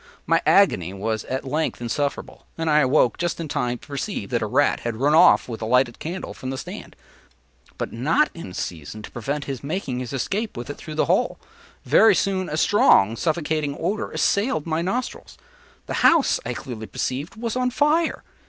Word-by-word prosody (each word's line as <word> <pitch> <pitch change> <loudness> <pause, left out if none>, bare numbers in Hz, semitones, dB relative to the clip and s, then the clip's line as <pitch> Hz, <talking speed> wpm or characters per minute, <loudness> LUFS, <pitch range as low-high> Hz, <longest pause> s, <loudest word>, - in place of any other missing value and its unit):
My - - +3
agony 95 - +4
was 110 +2 -2
at 130 +2 -4
length 150 +4 -1
insufferable, 140 +4 -3
and 165 -1 0
I 150 - +5
awoke 130 -3 +3
just 175 -1 -2
in 165 - -4
time 125 -3 -1
to - - -18
perceive 140 -2 -4
that - - 0
a - - -1
rat - - +2
had 120 -1 -3
ran 140 +6 +2
off 170 +3 +6
with 115 -3 -6
the 110 - -4
lighted 125 0 +2
candle 175 +4 -5
from 130 - -7
the 135 - -3
stand, - - -8 0.8
but - - -4
not 150 - +2
in 95 - -9
season 85 +6 -6
to - - -9
prevent 140 +4 -3
his 135 -2 -5
making 140 -5 -3
his 125 -2 -5
escape 200 - -2
with 120 +4 -5
it - - -9
through 155 - -8
the 155 - +2
hole. - - +1 0.5
Very 225 - +6
soon, 190 -2 0
a 155 - -3
strong 160 - +4
suffocating 155 -1 -1
odor 200 +6 -2
assailed 200 - 0
my 160 0 -1
nostrils; 240 +9 -4 0.5
the - - -5
house, 325 -4 +4
I 125 - -3
clearly 110 -1 -7
perceived, 140 +7 -4
was 230 +1 -4
on 250 0 +1
fire. 300 +6 +1
145 Hz, 190 wpm, -23 LUFS, 120-180 Hz, 0.8 s, off